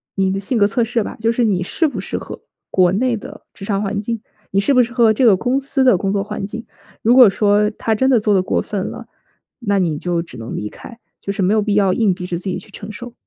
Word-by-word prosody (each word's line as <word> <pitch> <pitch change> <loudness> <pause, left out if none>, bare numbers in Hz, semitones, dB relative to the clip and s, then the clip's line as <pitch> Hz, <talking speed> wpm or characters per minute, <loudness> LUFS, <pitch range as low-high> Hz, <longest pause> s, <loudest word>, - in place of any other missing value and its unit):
你 190 -1 +1
的 195 - -2
性 235 +6 -1
格 205 -2 +4
测 235 +4 0
试 230 0 -1
吧。 - - -7
就 225 +1 +1
是 240 +1 0
你 190 -4 +1
适 320 - 0
不 - - -5
适 - - -4
合 - - -8 0.3
国 180 -2 +3
内 240 +5 +1
的 - - -11
职 - - -12
场 200 -1 -1
环 205 0 -2
境， 230 0 -4 0.3
你 195 - +2
适 275 +8 +2
不 250 - +5
适 235 0 -6
合 235 -3 +4
这 250 +4 +2
个 200 -5 +6
公 250 +5 0
司 275 0 -1
的 250 -8 +5
工 195 +2 -1
作 200 -1 0
环 200 - -5
境。 225 +3 -7 0.4
如 235 +3 +4
果 250 -5 +9
说 205 +1 +2
他 220 0 -1
真 260 +5 +2
的 250 -3 +4
做 210 0 +1
得 190 - +4
过 - - 0
分 200 -3 -4
了， - - -9 0.5
那 205 -5 0
你 165 -5 0
就 175 +1 -1
只 165 -7 -11
能 115 +1 -6
离 105 - -4
开， 230 - -12 0.2
就 200 - -3
是 200 0 -3
没 190 +2 +2
有 215 - +3
必 205 -1 -1
要 195 -3 +3
硬 210 -3 +2
逼 180 0 -7
着 175 -1 -3
自 180 - -10
己 190 - -2
去 185 - -12
承 205 +1 -9
受。 240 +2 -9
210 Hz, 305 characters per minute, -19 LUFS, 195-235 Hz, 0.5 s, 果